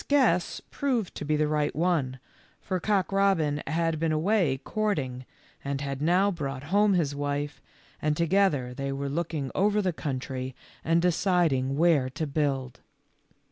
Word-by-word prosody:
guess 250 -12 +2
proved 250 -9 -1
to - - -6
be 150 +1 +1
the 150 0 +2
right 150 -1 0
one, 155 -6 0 0.4
for 185 -2 -2
Cock 195 -3 +1
robin 180 -7 +2
had 165 +1 0
been 165 0 +1
away 160 -3 +2
courting, 140 -13 -2 0.4
and 140 0 -2
had 140 -1 -4
now 180 +6 +3
brought 140 -6 -4
home 205 -1 +4
his 155 -5 +1
wife, 145 +1 -3 0.4
and 150 -1 0
together 170 -8 +2
they 140 +2 -3
were 140 +1 -3
looking 150 -3 -2
over 205 +2 +2
the 185 -4 0
country 130 -3 -4 0.3
and 165 +1 +2
deciding 165 -7 +2
where 155 -6 +3
to 155 +5 -3
build. 135 -4 -1
155 Hz, 150 wpm, -27 LUFS, 140-180 Hz, 0.4 s, home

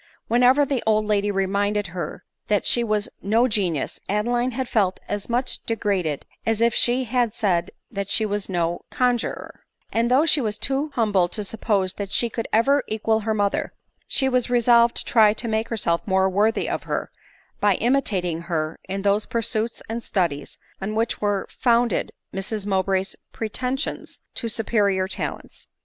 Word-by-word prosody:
Whenever 250 +5 +5
the 270 -3 -1
old 215 -1 +3
lady 205 -1 +1
reminded 200 +1 0
her 180 0 -5 0.2
that 205 -2 +1
she 240 - +2
was 215 -2 0
no 225 +5 +3
genius, 185 - -1
Adeline 240 +5 +1
had 255 +1 -3
felt 195 -6 +1
as 205 +1 -4
much 250 +2 -1
degraded 195 -9 -1 0.2
as 225 -1 0
if 235 0 +3
she 245 +2 +2
had 240 -2 0
said 180 -7 +1 0.2
that 200 -3 -4
she 220 - +2
was 205 -1 -2
no 175 -2 -1
conjurer; 245 -2 -1 0.3
and 230 +1 +2
though 265 +5 +4
she 305 -3 +4
was 215 -3 -2
too 275 +6 -1
humble 205 -6 +3
to 210 +3 -4
suppose 200 -2 0
that 200 -1 -6
she 235 -1 0
could 230 0 -3
ever 275 +6 +3
equal 220 0 +1
her 220 0 -1
mother, 205 -1 0 0.3
she 265 - +1
was 250 -1 +1
resolved 235 -1 +4
to - - -3
try 215 -3 +5
to 235 +2 -4
make 220 0 -1
herself 170 -7 0
more 190 -1 +3
worthy 210 +4 +1
of - - -2
her, - - -3 0.5
by 205 -2 +3
imitating 195 -9 0
her 155 -1 -2
in 195 +1 -3
those 205 +1 +2
pursuits 230 0 -1
and 230 +2 -3
studies 170 -10 -2 0.2
on 210 +3 -3
which 225 +1 -1
were 205 -2 0
founded 240 -4 +2 0.2
Mrs 195 +2 -3
Mow 190 -2 +2
bray's 190 0 -1 0.2
pretensions 255 +6 -3
to 230 - -4
superior 205 -4 +1
talents. - - -5
215 Hz, 170 wpm, -23 LUFS, 195-235 Hz, 0.5 s, Whenever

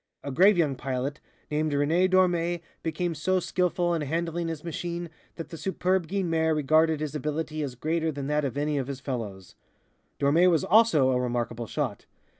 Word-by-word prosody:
A 140 - -4
grave 190 +8 +5
young 150 -5 +2
pilot 135 +2 -3 0.3
named 150 0 0
René 160 +6 +2
Dormé 175 -2 +2 0.2
became 170 +1 -2
so 185 +5 +1
skilful 180 -1 0
in 165 - -1
handling 165 +3 -2
his 160 -2 -5
machine 170 0 -4 0.2
that 165 - -7
the 165 - -8
superb 185 -1 0
Guynemer 165 -4 +1
regarded 155 +1 +3
his 150 -1 -3
ability 155 +1 -3
as 135 -4 -4
greater 160 +4 -1
than 140 -2 -5
that 150 +1 0
of 135 -1 -3
any 145 0 0
of 130 - -3
his 140 -2 -5
fellows. 110 -9 -5 0.7
Dormé 160 +6 +4
was 165 -4 +2
also 180 -11 +4
a 125 -1 +1
remarkable 120 -1 -2
shot. - - -3
155 Hz, 175 wpm, -27 LUFS, 140-175 Hz, 0.7 s, grave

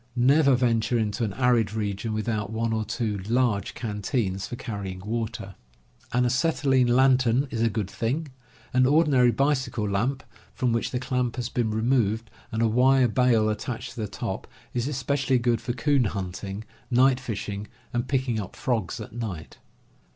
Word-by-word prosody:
Never 135 +3 +5
venture 120 -1 +1
into 110 +1 -1
an 105 -3 -1
arid 120 -4 +2
region 105 +1 -2
without 110 -1 -2
one 110 0 -1
or 110 -1 0
two 110 -2 -2
large 115 -5 +1
canteens 105 -3 -2
for - - -5
carrying 100 -5 -5
water. 110 -1 -4 0.6
An 125 +1 +2
acetylene 130 0 +2
lantern 130 +1 +4
is 115 - -2
a 115 - +3
good 105 -3 -2
thing. 135 +10 -2 0.4
An 130 0 +4
ordinary 140 -4 +4
bicycle 130 -3 0
lamp, 120 +7 -1 0.3
from 125 -2 +1
which 115 - 0
the 125 - -2
clamp 125 -2 -1
has 125 -2 -3
been 120 -3 0
removed, 110 -1 +1 0.2
and 110 0 0
a - - +4
wire 130 +3 +4
bail 120 -2 +3
attached 110 +2 -3
to 120 - -6
the 105 - -2
top, - - -5 0.3
is 120 +1 -1
especially 135 -1 0
good 120 -2 +1
for 120 +1 -2
coon 135 +1 +2
hunting, 95 +1 -4 0.3
night 130 +1 +4
fishing 105 -4 -5 0.3
and 120 0 -1
picking 130 -4 0
up 100 - -6
frogs 110 -9 -1
at - - -8
night. 105 -10 -6
120 Hz, 165 wpm, -26 LUFS, 110-130 Hz, 0.6 s, Never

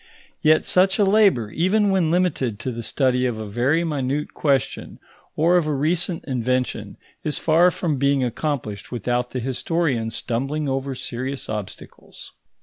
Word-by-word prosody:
Yet 155 0 +4
such 190 +1 +3
a 210 - +4
labour, 195 - +3
even 200 +4 +2
when 185 -4 +2
limited 160 - 0
to 130 - -3
the 120 0 -5
study 125 +1 +1
of 120 -3 -3
a 110 - -5
very 125 +10 +1
minute 145 -2 -2
question 140 -5 -1 0.4
or 170 +3 +4
of 165 -3 +1
a 150 - 0
recent 165 +4 0
invention, 125 -1 -2 0.3
is 150 - -1
far 165 +3 +4
from 165 -4 -2
being 140 -1 +2
accomplished 120 -5 -3
without 125 +1 -1
the 125 - -4
historian 130 -1 -1
stumbling 135 +7 -2
over 135 0 -2
serious 130 +2 -5
obstacles. 105 -3 -8
140 Hz, 150 wpm, -22 LUFS, 125-165 Hz, 0.4 s, Yet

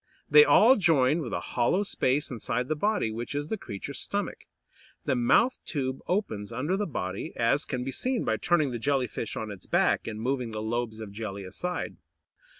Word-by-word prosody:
They 450 - +9
all 260 - +6
join 155 -5 +3
with 125 - -5
a - - -1
hollow 125 +11 +2
space 145 -8 0
inside 125 +1 -2
the 155 - +1
body, 205 - 0
which 120 +5 -5
is 145 +2 -2
the - - 0
creature's 100 - -6
stomach. - - -3 0.6
The - - +1
mouth 125 - +3
tube 130 -4 -3
opens 115 - -1
under 145 +10 -1
the 205 +1 -1
body, 95 - -4
as 120 +6 +2
can 125 -2 -3
be 135 - -3
seen 255 - 0
by 110 - +1
turning 155 +2 +2
the 120 - -4
Jelly 135 +1 +1
fish 115 - -5
on 110 -1 -4
its 100 -3 -10
back, - - +2
and 110 -1 -4
moving 125 -1 -2
the 110 - -3
lobes 110 0 -2
of 105 -2 -7
jelly 100 -2 -5
aside. 175 - -4
125 Hz, 195 wpm, -28 LUFS, 110-160 Hz, 0.6 s, They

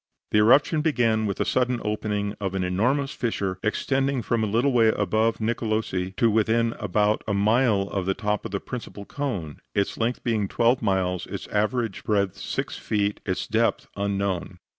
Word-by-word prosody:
The 105 - +4
eruption 140 +8 +5
began 115 -8 +2
with 100 - -2
the - - 0
sudden 125 -1 +1
opening 105 -1 -1
of 95 -1 -2
an 95 - 0
enormous 125 +10 +1
fissure, 100 -6 -2
extending 135 +3 0
from 115 -2 0
a - - +1
little 120 +7 +2
way 115 -3 +4
above 110 +2 +1
Nicolosi 110 -5 -1
to 115 -2 +3
within 115 +2 +2
about 105 +1 +1
a 100 - 0
mile 110 0 +3
of 95 -1 -3
the 95 - +1
top 105 -1 -1
of 115 - -5
the 100 -1 -2
principal 115 -4 -7
cone, 100 - -4 0.2
its 100 0 0
length 120 +2 -1
being 110 -4 0
twelve 120 +5 +2
miles, 90 -2 0
its - - -6
average 110 +1 -1
breadth 100 -3 +1
six - - -4
feet, 105 -1 -1
its 95 - -1
depth 115 +1 +1
unknown. 100 -2 -2
110 Hz, 175 wpm, -25 LUFS, 100-120 Hz, 0.2 s, eruption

